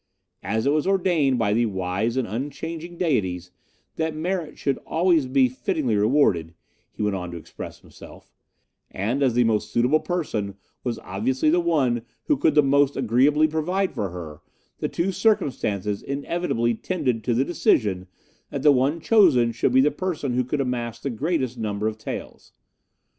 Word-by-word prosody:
As 110 +4 -1
it 140 - +3
was 155 +3 +1
ordained 175 -9 +2
by 105 -3 +1
the 115 +1 +2
wise 95 +4 -2
and 130 - 0
unchanging 160 - -5
Deities 95 - -1 0.5
that 160 -1 -1
merit 170 0 -3
should 140 - -1
always 165 -4 +1
be 130 0 +4
fittingly 130 - -1
rewarded, 100 - +2 0.4
he - - -5
went 105 -1 0
on 90 -2 -4
to 85 - -7
express 80 - -9
himself, - - -15 0.6
and 115 +9 -2
as 130 -4 +2
the 125 - +4
most 110 -2 0
suitable 125 +6 +3
person 110 - -3 0.3
was 120 -3 -2
obviously 130 +10 0
the 175 - +3
one 140 -9 +1 0.2
who 300 - +2
could 160 - +2
the 150 - +6
most 140 0 +3
agreeably 135 +5 +3
provide 180 +5 -1
for 100 - -2
her, 80 -4 -8 0.4
the - - -2
two 175 +3 -1
circumstances 105 - 0
inevitably 140 -4 -1
tended 125 -4 -2
to 120 +1 0
the 130 +3 +2
decision 105 - +1 0.4
that - - -4
the 150 - +7
one 140 +4 +2
chosen 160 - +4
should 115 +3 0
be 130 +1 +5
the 150 +2 +3
person 150 -5 -3
who 125 +1 +1
could 140 +3 -2
amass 120 -3 -3
the 140 - -3
greatest 130 -2 -2
number 105 -1 -2
of 110 0 -4
taels. - - -7
130 Hz, 170 wpm, -24 LUFS, 110-155 Hz, 0.6 s, the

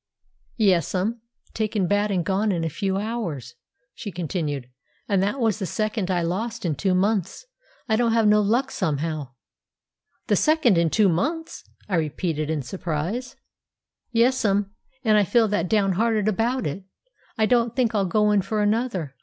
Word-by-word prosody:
"Yes'm; 195 +2 +1 0.3
taken 215 -3 0
bad 205 +3 +1
and 180 -4 0
gone 200 +3 +1
in 170 -3 -1
a 165 - -2
few 195 +3 -1
hours," 205 - -4 0.4
she 220 -6 -7
continued. 155 -6 -3 0.4
"And 200 -2 +2
that 205 +8 -1
was 225 -4 +1
the 190 - -2
second 215 +1 -2
I 175 -2 +1
lost 220 +6 -3
in 165 - +1
two 185 +5 0
months. 195 - 0 0.4
I 220 -2 +2
don't 235 -1 +2
have 225 -2 +3
no 210 0 +5
luck 235 +7 +1
somehow." 150 -5 -2 0.9
"The - - +2
second 310 - +3
in 170 -1 +2
two 210 +4 +3
months!" 310 - -2 0.2
I 185 - 0
repeated 155 0 -2
in 155 -3 -1
surprise. 180 - -4 0.8
"Yes'm, 225 -5 +2 0.3
and 215 -3 +4
I - - +4
feel 225 +4 +3
that 180 -4 0
downhearted 210 +1 +2
about 230 +5 0
it, 170 +6 -4 0.5
I 220 - +3
don't 235 0 +2
think 245 -4 +1
I'll 200 -3 +1
go 210 +3 +2
in 205 -1 +3
for 210 +2 -1
another. 205 - -1
205 Hz, 160 wpm, -24 LUFS, 175-225 Hz, 0.9 s, no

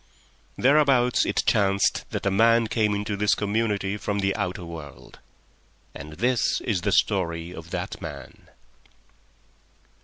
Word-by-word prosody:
Thereabout 135 -3 +3
it - - 0
chanced 100 -1 +2
that - - -5
a 100 - +2
man 115 +3 +4
came 105 -2 0
into 105 0 -3
this 105 +1 +2
community 105 -1 -1
from 105 0 -3
the 95 -1 0
outer 90 0 -3
world. 80 -4 -11 0.7
And 75 +2 -9
this 125 +7 +1
is 100 -7 -1
the 100 +3 -1
story 85 -4 0
of 85 -2 -10
that - - -5
man. - - -9
100 Hz, 130 wpm, -25 LUFS, 90-115 Hz, 0.7 s, man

